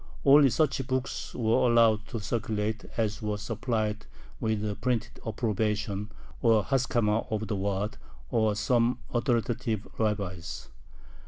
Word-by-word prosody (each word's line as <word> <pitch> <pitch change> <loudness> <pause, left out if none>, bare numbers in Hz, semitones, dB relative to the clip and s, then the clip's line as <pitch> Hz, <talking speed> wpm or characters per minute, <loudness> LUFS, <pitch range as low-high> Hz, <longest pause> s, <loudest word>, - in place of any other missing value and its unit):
Only 140 0 +8
such 135 -2 +1
books 130 0 -3
were 115 +1 +3
allowed 115 -2 +4
to 115 - -4
circulate 110 0 -2
as 110 -1 -1
were 105 -1 -1
supplied 110 0 -2 0.3
with 110 -1 0
a 105 - -1
printed 125 -1 -2
approbation, 105 -2 -1 0.3
or 115 -3 +4
haskama, 120 -4 +1
of 110 0 -1
the 105 - -1
Waad 100 +2 -2 0.3
or 110 -4 +2
some 120 +3 +2 0.2
authoritative 120 -2 0
rabbis. 100 -6 -2
110 Hz, 120 wpm, -28 LUFS, 105-120 Hz, 0.3 s, Only